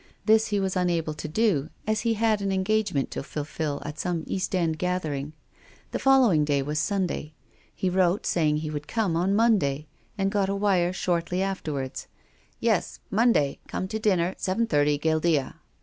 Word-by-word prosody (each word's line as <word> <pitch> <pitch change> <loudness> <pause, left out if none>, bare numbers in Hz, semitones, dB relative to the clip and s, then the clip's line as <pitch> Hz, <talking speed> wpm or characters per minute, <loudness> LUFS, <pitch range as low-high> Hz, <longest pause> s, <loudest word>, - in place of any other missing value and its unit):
This 220 0 +4
he 205 -1 0
was 190 -1 -1
unable 170 -4 0
to 150 - -6
do 160 -4 +1 0.2
as 215 0 +1
he 230 -1 +1
had 220 -1 +1
an 195 -1 -1
engagement 190 -6 0
to - - -4
fulfil 150 0 -4
at 150 +1 -6
some 175 -3 -1
East 190 0 -2
End 165 -3 0
gathering. 155 -5 -2 0.6
The - - -2
following 255 - +5
day 145 -2 +1
Avas 150 +2 -3
Sunday. 175 -4 -1 0.5
lie 185 - +3
wrote 185 +1 +2
say 160 -3 +2
ing 150 - +1
he 155 0 -4
would 150 -1 -5
come 200 -3 0
on 175 +3 +1
the 200 - +2
Monday, 185 -11 +2 0.3
and 195 0 0
got 200 -2 +1
a 200 - 0
wire 190 -3 +2
shortly 180 0 -1
afterwards: 150 -9 -4 0.5
"Yes, - - 0
Monday 205 - +2
come 185 - -3
to 220 - -3
dinner 185 -5 +1
seven 195 +5 0
thirty 145 -5 +2
Guildea." 155 -2 +1
180 Hz, 180 wpm, -26 LUFS, 150-200 Hz, 0.6 s, following